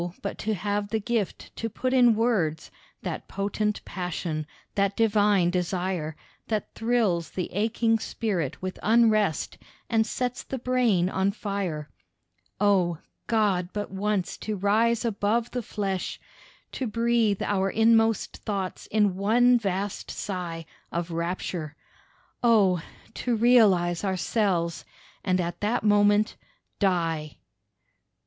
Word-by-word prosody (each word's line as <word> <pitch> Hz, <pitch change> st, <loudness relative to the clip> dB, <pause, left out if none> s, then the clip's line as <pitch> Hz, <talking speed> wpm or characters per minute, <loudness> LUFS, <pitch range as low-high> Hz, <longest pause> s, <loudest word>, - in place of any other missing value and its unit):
but 200 Hz, -, -3 dB
to 220 Hz, 0 st, -1 dB
have 205 Hz, +2 st, -1 dB
the 220 Hz, -, 0 dB
gift 220 Hz, -2 st, -3 dB
to 225 Hz, -, -3 dB
put 255 Hz, +4 st, -2 dB
in 245 Hz, -3 st, +6 dB
words, 210 Hz, -9 st, 0 dB, 0.3 s
That -, -, -4 dB
potent 210 Hz, +1 st, -2 dB
passion, 170 Hz, -4 st, -3 dB, 0.3 s
that 200 Hz, 0 st, 0 dB
divine 205 Hz, -5 st, +3 dB
desire, 180 Hz, -3 st, -2 dB, 0.3 s
That 215 Hz, -2 st, -2 dB
thrills 225 Hz, -8 st, +1 dB
the 180 Hz, -, -4 dB
aching 225 Hz, +3 st, +1 dB
spirit 185 Hz, -, -2 dB
with 185 Hz, 0 st, -4 dB
unrest 215 Hz, -6 st, +2 dB, 0.3 s
And 225 Hz, -1 st, +3 dB
sets 250 Hz, +2 st, -2 dB
the 265 Hz, -, -5 dB
brain 240 Hz, -8 st, +2 dB
on 190 Hz, +1 st, +1 dB
fire. 195 Hz, -8 st, -3 dB, 0.7 s
Oh! 190 Hz, -5 st, +3 dB, 0.3 s
God, 200 Hz, -6 st, +1 dB
but 205 Hz, -2 st, -4 dB
once 195 Hz, -1 st, -1 dB
to 215 Hz, -, -3 dB
rise 220 Hz, +4 st, +2 dB
above 225 Hz, +2 st, 0 dB
the 250 Hz, -, -2 dB
flesh, 195 Hz, -4 st, -3 dB, 0.5 s
To 260 Hz, -, -3 dB
breathe 230 Hz, -2 st, +1 dB
our 195 Hz, -1 st, +1 dB
inmost 225 Hz, +1 st, +3 dB
thoughts 195 Hz, -3 st, -4 dB
in 210 Hz, -3 st, +2 dB
one 240 Hz, +5 st, +4 dB
vast 195 Hz, -1 st, -3 dB
sigh 175 Hz, -4 st, -4 dB, 0.3 s
Of 170 Hz, 0 st, -3 dB
rapture. 170 Hz, -2 st, -3 dB, 0.7 s
Oh! 205 Hz, -7 st, +4 dB, 0.3 s
to 245 Hz, -2 st, -1 dB
realise 210 Hz, -8 st, +4 dB
ourselves, 185 Hz, -2 st, 0 dB, 0.4 s
And 185 Hz, -1 st, +1 dB
at 175 Hz, -1 st, -2 dB
that 210 Hz, +3 st, 0 dB
moment... 205 Hz, 0 st, +3 dB, 0.4 s
die. 165 Hz, -6 st, 0 dB
205 Hz, 120 wpm, -26 LUFS, 180-225 Hz, 0.7 s, in